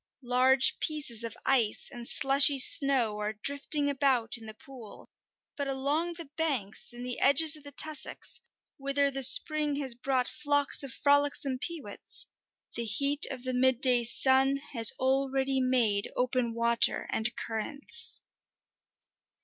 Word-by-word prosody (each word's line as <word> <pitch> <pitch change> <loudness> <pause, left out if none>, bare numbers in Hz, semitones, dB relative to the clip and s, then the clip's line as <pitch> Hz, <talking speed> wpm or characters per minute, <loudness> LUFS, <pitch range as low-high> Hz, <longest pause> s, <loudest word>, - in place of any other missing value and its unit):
Large 255 +2 +1
pieces 275 -7 -2
of 230 -1 -9
ice 240 -6 -1
and 240 -1 -5
slushy 275 +1 +5
snow 260 -6 +6
are 210 +1 -5
drifting 285 +6 -1
about 265 -5 0
in 225 -2 -7
the 215 - -11
pool, 245 -4 -16 0.4
but 285 -1 -6
along 285 +6 -4
the 335 0 -9
banks 265 -13 -5
and 240 +1 -9
the 250 -1 -6
edges 300 +3 +5
of 305 - -14
the 285 - -13
tussocks, 305 +1 -5 0.4
whither 280 0 -2
the 270 0 -6
spring 300 - +3
has 275 -3 -4
brought 255 +1 -4
flocks 285 -1 +1
of 275 -3 -3
frolicsome 285 -1 -1
peewits, 290 -10 -3 0.5
the 235 - -6
heat 280 +7 +1
of 255 -2 -10
the 255 0 -5
midday 250 -1 +1
sun 265 +3 0 0.2
has 230 -3 +6
already 265 0 -2
made 235 -6 -1
open 250 -2 -3
water 235 0 0
and 225 +2 0
currents. 230 +6 0
265 Hz, 140 wpm, -26 LUFS, 240-285 Hz, 0.5 s, snow